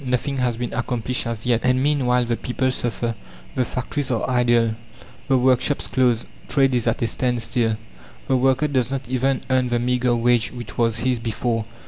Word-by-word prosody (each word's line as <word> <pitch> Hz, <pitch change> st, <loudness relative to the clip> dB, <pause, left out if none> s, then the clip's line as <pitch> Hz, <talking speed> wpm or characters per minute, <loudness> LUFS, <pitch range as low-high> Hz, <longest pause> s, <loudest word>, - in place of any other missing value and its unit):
Nothing 130 Hz, +2 st, -1 dB
has 125 Hz, -3 st, 0 dB
been 120 Hz, -1 st, -4 dB
accomplished 125 Hz, -1 st, -2 dB
as 115 Hz, -1 st, -4 dB
yet. 120 Hz, -2 st, +2 dB
And 125 Hz, +1 st, +2 dB
meanwhile 125 Hz, -4 st, +2 dB
the 120 Hz, 0 st, 0 dB
people 130 Hz, +2 st, -1 dB
suffer. 120 Hz, -1 st, -2 dB, 0.4 s
The 130 Hz, -, +1 dB
factories 130 Hz, +3 st, -3 dB
are 115 Hz, -3 st, 0 dB
idle, 120 Hz, -2 st, +3 dB, 0.5 s
the 135 Hz, -, +4 dB
workshops 130 Hz, +2 st, +2 dB
closed; 125 Hz, -3 st, +1 dB, 0.2 s
trade 135 Hz, -2 st, +2 dB
is 120 Hz, -2 st, +1 dB
at -, -, 0 dB
a -, -, +3 dB
standstill. 115 Hz, -1 st, 0 dB, 0.5 s
The 130 Hz, -, +2 dB
worker 135 Hz, +3 st, +2 dB
does 130 Hz, -4 st, 0 dB
not 135 Hz, -2 st, -4 dB
even 130 Hz, +1 st, 0 dB
earn 130 Hz, -1 st, +3 dB
the 120 Hz, 0 st, +1 dB
meagre 125 Hz, 0 st, +1 dB
wage 120 Hz, -1 st, +2 dB
which 120 Hz, -1 st, -8 dB
was 115 Hz, -1 st, +1 dB
his 125 Hz, +1 st, 0 dB
before. 115 Hz, 0 st, -2 dB
125 Hz, 180 wpm, -22 LUFS, 120-130 Hz, 0.5 s, the